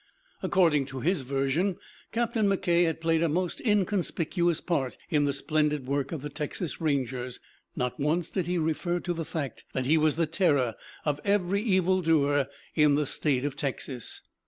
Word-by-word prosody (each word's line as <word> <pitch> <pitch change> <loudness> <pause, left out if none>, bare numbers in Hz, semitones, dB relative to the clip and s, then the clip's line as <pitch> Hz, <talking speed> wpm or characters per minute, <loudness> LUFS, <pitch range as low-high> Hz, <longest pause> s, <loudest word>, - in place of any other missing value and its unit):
According 160 -8 +3
to 135 -2 -6
his 175 +2 +1
version 140 +8 0 0.3
Captain 230 -2 +1
McKay 175 -3 +3
had 165 -1 -1
played 165 0 +2
a 170 - +2
most 180 +3 -1
inconspicuous 180 -5 +1
part 135 -8 -1
in 150 -2 +3
the 140 - +2
splendid 150 -1 0
work 140 0 -1
of 155 -5 -4
the 150 - -4
Texas 150 +4 -4
Rangers. 130 -5 -1 0.4
Not 125 +2 -2
once 155 +4 0
did 185 -4 -1
he 180 0 0
refer 170 +2 0
to 175 0 -2
the 165 -1 -4
fact 145 -5 -4
that 130 -1 -1
he 155 +4 +4
was 155 -1 +3
the 165 0 +2
terror 150 - +2 0.3
of 150 -1 0
every 200 -1 +1
evil 185 -3 +2
doer 145 -4 +3 0.3
in 150 -2 +4
the 150 0 +1
State 135 -1 0
of 145 -2 -2
Texas. 135 -3 -4
155 Hz, 175 wpm, -28 LUFS, 140-175 Hz, 0.4 s, he